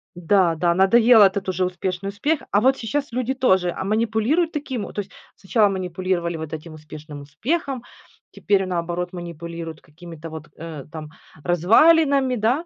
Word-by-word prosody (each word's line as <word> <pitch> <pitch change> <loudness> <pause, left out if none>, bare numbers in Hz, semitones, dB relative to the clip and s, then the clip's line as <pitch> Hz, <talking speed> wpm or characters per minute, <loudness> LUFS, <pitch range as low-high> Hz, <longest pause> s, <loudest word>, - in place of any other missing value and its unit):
Да 175 -1 +2
да, 170 +1 +1
надоел 220 +5 +5
этот 195 -1 +3
уже 185 0 0
успешный 185 +2 -3
успех. 290 +10 -1
А 205 - +3
вот 265 +2 +3
сейчас 275 +4 -3
люди 255 +2 -1
тоже, 190 -9 +2
а, 190 - -5
манипулируют 225 - +1
таким. 265 -7 -4
Вот - - -9
то - - -3
есть 195 - -13 0.2
сначала 205 +1 +2
манипулировали 180 -2 -2
вот 160 -1 -7
этим 155 +1 -7
успешным 155 -1 -10
успехом, 250 - -3 0.5
теперь 195 -2 +1
наоборот, 175 0 -3
манипулируют 170 -2 -7
какими-то 165 0 -11
вот, 155 -1 -9
э, 160 -4 -8
там 155 -2 -8 0.3
развалинами, 265 - +4
да. 245 +10 0
190 Hz, 155 wpm, -22 LUFS, 170-235 Hz, 0.5 s, надоел